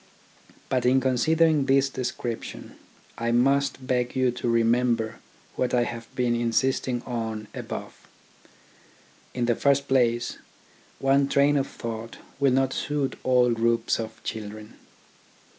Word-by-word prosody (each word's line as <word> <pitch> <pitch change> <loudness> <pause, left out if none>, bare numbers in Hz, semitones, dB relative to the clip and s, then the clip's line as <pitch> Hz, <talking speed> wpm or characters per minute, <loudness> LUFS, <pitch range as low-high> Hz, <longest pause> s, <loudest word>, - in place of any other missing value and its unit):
But 130 -2 0
in 125 +2 +4
considering 150 +3 +2
this 135 0 +4
description, 125 -3 -5 0.4
I 115 0 0
must 135 +2 +2
beg 125 -1 -1
you 130 -1 +2
to 120 0 -3
remember 115 -1 +1 0.4
what 125 0 0
I 120 - +3
have 115 -1 -6
been 125 -2 +1
insisting 120 +1 0
on 110 -3 -4
above. - - -7 1.3
In 125 -1 0
the 120 -1 +2
first 140 +2 +2
place, 120 -2 +1 0.6
one 135 +1 +3
train 140 +1 +3
of 140 -1 +1
thought 115 -1 -7 0.2
will 140 -2 +3
not 130 0 +2
suit 145 -2 -2
all 125 -1 +3
groups 115 0 +1
of 110 -1 -7
children. 110 0 -6
125 Hz, 125 wpm, -26 LUFS, 115-135 Hz, 1.3 s, in